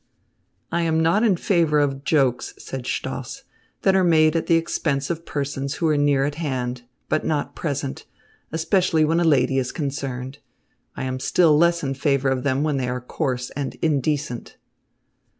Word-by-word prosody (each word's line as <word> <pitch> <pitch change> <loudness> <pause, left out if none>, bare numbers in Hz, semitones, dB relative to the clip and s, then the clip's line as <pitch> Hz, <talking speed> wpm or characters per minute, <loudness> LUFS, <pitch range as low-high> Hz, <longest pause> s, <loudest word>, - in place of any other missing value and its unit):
"I 170 - +1
am 160 -1 +1
not 165 +6 +3
in 220 -5 +4
favour 165 -5 +2
of 140 -2 0
jokes," 135 -5 +1
said 130 -2 -7
Stoss, - - -4 0.4
"that 190 - +4
are 190 - +4
made 155 -2 +4
at 165 - 0
the 165 - +4
expense 150 -3 0
of 165 0 -5
persons 140 -1 -3
who 165 - 0
are 155 - +3
near 145 -2 +3
at 145 0 -2
hand, 125 -4 -2 0.3
but 155 - 0
not 150 -2 -2
present, 140 -3 -4 0.4
especially 165 0 +2
when 165 +2 +2
a - - +2
lady 135 -4 +3
is 130 -1 -2
concerned. 135 -3 -4 0.6
I - - -4
am 130 0 -3
still 160 +3 +4
less 170 +2 +3
in 135 -1 -1
favour 140 -1 +1
of 130 -1 0
them 135 +1 0
when 150 -2 0
they 125 -2 -1
are 125 0 -2
coarse 125 -1 -3
and 140 -1 -4
indecent." 145 -4 -1
145 Hz, 175 wpm, -23 LUFS, 135-160 Hz, 0.6 s, in